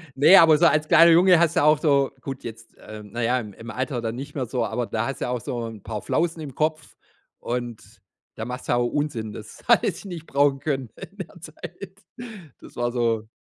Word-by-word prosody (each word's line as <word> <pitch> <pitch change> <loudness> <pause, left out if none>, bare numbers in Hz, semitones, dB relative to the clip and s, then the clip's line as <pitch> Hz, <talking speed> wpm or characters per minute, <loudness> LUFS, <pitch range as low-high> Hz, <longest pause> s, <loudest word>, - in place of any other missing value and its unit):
Ne, 160 +8 +7
aber 160 -3 +7
so 170 - +3
als 155 +1 +1
kleiner 170 0 +7
Junge 175 +1 +6
hast 170 -1 +2
du - - +3
auch 150 0 +5
so 140 -3 +2
gut, 135 0 -7
jetzt, 115 0 -10
äh, 110 0 -10
na 115 +3 -5
ja, 125 +2 +2
im 105 -4 -8
im 115 +2 -9
Alter 130 -1 -3
dann 115 0 -3
nicht 140 +3 -8
mehr 130 -3 -2
so, 120 0 -2
aber 115 +3 -2
da 110 +2 -2
hast 135 - -6
du - - 0
ja 125 - -3
auch 125 -2 -2
so 120 +1 -4
'n 110 -3 -10
paar 105 -2 -6
Flausen 165 -1 -1
im 140 -4 -7
Kopf, 155 0 -2 0.4
und 120 -2 -4 0.5
da 110 - -5
machst 125 +1 -7
du - - 0
ja 120 - +3
auch 120 - +1
Unsinn, 120 -7 -3
das - - -11
hatte - - +4
ich - - -4
nicht 170 -4 -7
brauchen 140 0 +2
können 135 -6 -3
in 200 - -12
der 185 -1 -9
Zeit. 175 +4 -10 0.7
Das - - -14
war 120 0 -1
so 115 -3 -1
135 Hz, 235 wpm, -24 LUFS, 115-155 Hz, 0.7 s, Ne